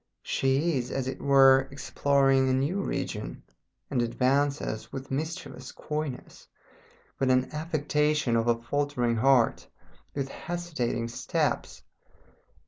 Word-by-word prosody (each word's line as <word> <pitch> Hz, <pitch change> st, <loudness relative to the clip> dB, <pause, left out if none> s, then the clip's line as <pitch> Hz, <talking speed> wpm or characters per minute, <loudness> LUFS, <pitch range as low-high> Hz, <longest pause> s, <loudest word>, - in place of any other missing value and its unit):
She 135 Hz, +3 st, +1 dB
is, 120 Hz, -, -5 dB
as 135 Hz, -1 st, -2 dB
it 130 Hz, -, -5 dB
were, 135 Hz, -1 st, +6 dB
exploring 135 Hz, 0 st, +2 dB
a -, -, +2 dB
new 145 Hz, +10 st, 0 dB
region, -, -, -4 dB, 0.5 s
and 130 Hz, -3 st, +1 dB
advances 130 Hz, 0 st, 0 dB
with 135 Hz, 0 st, -7 dB
mischievous 140 Hz, -3 st, -5 dB
coyness, 150 Hz, -4 st, -6 dB, 0.7 s
with 135 Hz, -1 st, +2 dB
an 130 Hz, 0 st, +2 dB
affectation 150 Hz, -4 st, 0 dB
of 115 Hz, 0 st, +1 dB
a 115 Hz, -1 st, +2 dB
faltering 125 Hz, -1 st, -1 dB
heart, 130 Hz, -1 st, +3 dB, 0.5 s
with 140 Hz, -1 st, -2 dB
hesitating 150 Hz, -10 st, -3 dB
steps. 115 Hz, -, -2 dB
135 Hz, 115 wpm, -28 LUFS, 125-145 Hz, 0.7 s, were